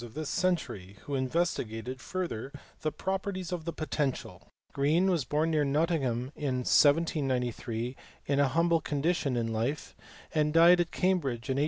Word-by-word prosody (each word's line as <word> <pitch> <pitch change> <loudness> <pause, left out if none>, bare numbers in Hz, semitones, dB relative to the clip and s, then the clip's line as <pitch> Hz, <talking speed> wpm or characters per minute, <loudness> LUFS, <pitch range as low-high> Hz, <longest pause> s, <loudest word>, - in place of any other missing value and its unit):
487 120 +4 -8
this 155 - -4
century 130 - -1
who 145 - -6
investigated 130 -4 -2
further 165 -9 -4 0.3
the 155 - -1
properties 190 -1 -3
of 175 -3 -4
the 170 - -2
potential. 150 -4 -3 0.3
Green 160 +7 +2
was 165 -8 0
born 155 +5 0
near 155 -2 +2
Nottingham 140 -4 0
in 130 -4 -2
1793 130 -6 +2 0.3
in 140 0 +1
a 140 - +4
humble 165 +3 +2
condition 145 -2 0
in 115 -1 -1
life, 120 +7 -2 0.4
and 150 -1 +1
died 170 +2 +7
at 175 -1 +1
Cambridge 145 -13 0
in 130 - 0
1841. - - +1
145 Hz, 155 wpm, -29 LUFS, 125-170 Hz, 0.4 s, died